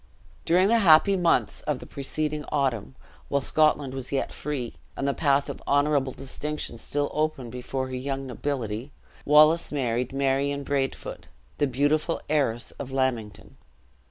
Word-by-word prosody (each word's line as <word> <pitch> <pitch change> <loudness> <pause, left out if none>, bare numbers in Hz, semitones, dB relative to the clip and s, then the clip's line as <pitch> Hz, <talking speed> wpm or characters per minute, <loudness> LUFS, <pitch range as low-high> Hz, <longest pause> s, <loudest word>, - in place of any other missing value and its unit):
During 180 +3 +4
the 230 +2 +4
happy 195 +1 +6
mouths 175 -3 +1
of 150 -3 +1
the - - -10
preceding 150 +2 -3
autumn, 130 -5 -1 0.3
while 140 - +1
Scotland 145 -1 +2
was 135 -1 -6
yet 135 - -1
free, 135 -5 -4 0.2
and 140 - -1
the 140 - +2
path 140 -2 +2
of - - -6
honorable 145 -1 +2
distinction 135 -1 -5
still 145 +4 -1
open 150 -6 -1
before 130 +2 -3
her 130 - -4
young 135 +1 -3
nobility, 125 -2 -4 0.3
Wallace 155 +3 +5
married 125 -3 -1
Marion 140 +1 0
Braidfoot, 135 -1 -3 0.3
the 145 - +3
beautiful 145 +5 +1
heiress 120 -6 +1
of 140 - -5
Lammington. 130 -6 -2
140 Hz, 145 wpm, -26 LUFS, 130-150 Hz, 0.3 s, happy